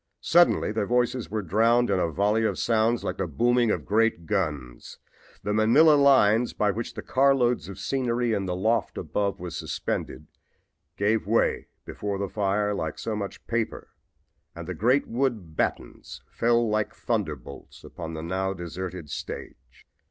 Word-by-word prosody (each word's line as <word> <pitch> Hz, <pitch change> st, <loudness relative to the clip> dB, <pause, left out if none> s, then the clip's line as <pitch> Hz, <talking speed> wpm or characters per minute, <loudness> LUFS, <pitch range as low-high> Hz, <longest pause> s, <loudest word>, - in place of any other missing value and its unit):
Suddenly 175 Hz, -9 st, +4 dB
their 105 Hz, -2 st, -1 dB
voices 125 Hz, 0 st, 0 dB
were 105 Hz, 0 st, -3 dB
drowned 115 Hz, +5 st, +2 dB
in 95 Hz, -, +2 dB
a 85 Hz, -, +1 dB
volley 105 Hz, +6 st, +1 dB
of 110 Hz, -, 0 dB
sounds 115 Hz, +1 st, +1 dB
like -, -, -3 dB
the 95 Hz, -, -2 dB
booming 120 Hz, -, +2 dB
of -, -, -1 dB
great 110 Hz, -5 st, +1 dB
guns. 75 Hz, -9 st, -3 dB, 0.5 s
The 105 Hz, +1 st, -1 dB
manila 115 Hz, +9 st, +5 dB
lines 125 Hz, -5 st, +4 dB
by 105 Hz, -1 st, +1 dB
which 115 Hz, +4 st, -5 dB
the -, -, -6 dB
carloads 130 Hz, -4 st, +2 dB
of 100 Hz, -, -8 dB
scenery 120 Hz, 0 st, -1 dB
in 100 Hz, -2 st, -1 dB
the 90 Hz, -, -2 dB
loft 110 Hz, +6 st, 0 dB
above 100 Hz, -1 st, -2 dB
was 90 Hz, -2 st, -6 dB
suspended -, -, -4 dB, 0.7 s
gave 105 Hz, +1 st, +1 dB
way 115 Hz, +2 st, +1 dB, 0.2 s
before 100 Hz, -1 st, -4 dB
the 100 Hz, 0 st, -3 dB
fire 105 Hz, +1 st, 0 dB
like 80 Hz, -6 st, -4 dB
so 110 Hz, -, -3 dB
much 100 Hz, -2 st, -6 dB
paper 115 Hz, -1 st, -3 dB, 0.7 s
and 85 Hz, 0 st, -8 dB
the 90 Hz, -, -3 dB
great 125 Hz, -, +2 dB
wooden 115 Hz, -9 st, -2 dB
batons -, -, -4 dB
fell 120 Hz, 0 st, +2 dB
like 110 Hz, 0 st, -1 dB
thunder 105 Hz, -10 st, -1 dB
bolts 70 Hz, +1 st, -13 dB
upon 80 Hz, -1 st, -7 dB
the 80 Hz, -, -6 dB
now 95 Hz, +3 st, -2 dB
deserted 90 Hz, -1 st, -6 dB
stage. -, -, -8 dB
105 Hz, 160 wpm, -26 LUFS, 95-120 Hz, 0.7 s, manila